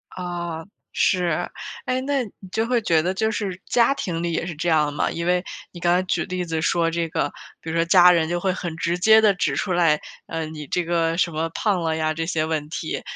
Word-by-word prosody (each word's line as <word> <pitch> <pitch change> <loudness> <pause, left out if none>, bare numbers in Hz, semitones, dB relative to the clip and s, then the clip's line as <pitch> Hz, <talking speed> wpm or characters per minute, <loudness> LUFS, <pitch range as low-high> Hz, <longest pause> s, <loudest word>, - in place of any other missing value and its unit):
啊， 175 -3 -5 0.3
是。 180 -2 +1 0.4
诶， 255 0 0
那 275 0 0
你 210 - -10 0.2
就 220 +3 0
会 245 -1 +1
觉 165 -6 +3
得 180 +3 -1
就 220 +3 0
是 190 -4 -4
家 240 +3 +3
庭 170 -11 -3
里 170 0 -1
也 165 - -1
是 175 - -4
这 160 +4 -3
样 150 -2 +2
吗？ 145 - 0
因 170 - -4
为 180 0 +2 0.3
你 175 - -10
刚 175 +1 +3
才 185 - +2
举 185 - -1
例 180 0 -3
子 165 -2 -2
说 165 0 +1
这 170 0 -1
个， - - -1 0.3
比 160 - -7
如 160 - -3
说 165 - +2
家 180 +1 +7
人 165 -2 +2
就 175 +1 -1
会 190 +1 +1
很 175 -3 -4
直 170 +1 -1
接 220 +3 +6
地 210 -2 +5
指 155 -6 -1
出 185 - -2
来， 165 -4 +3 0.3
呃， 165 -1 -3
你 155 -2 -8
这 180 - 0
个 165 -1 0
什 175 -1 +1
么 160 +1 -2
“胖 200 -5 +1
了 160 -1 0
呀” 155 0 0
这 165 +1 -3
些 160 -2 0
问 155 -2 -2
题， 160 0 -4
170 Hz, 260 characters per minute, -23 LUFS, 160-185 Hz, 0.4 s, 家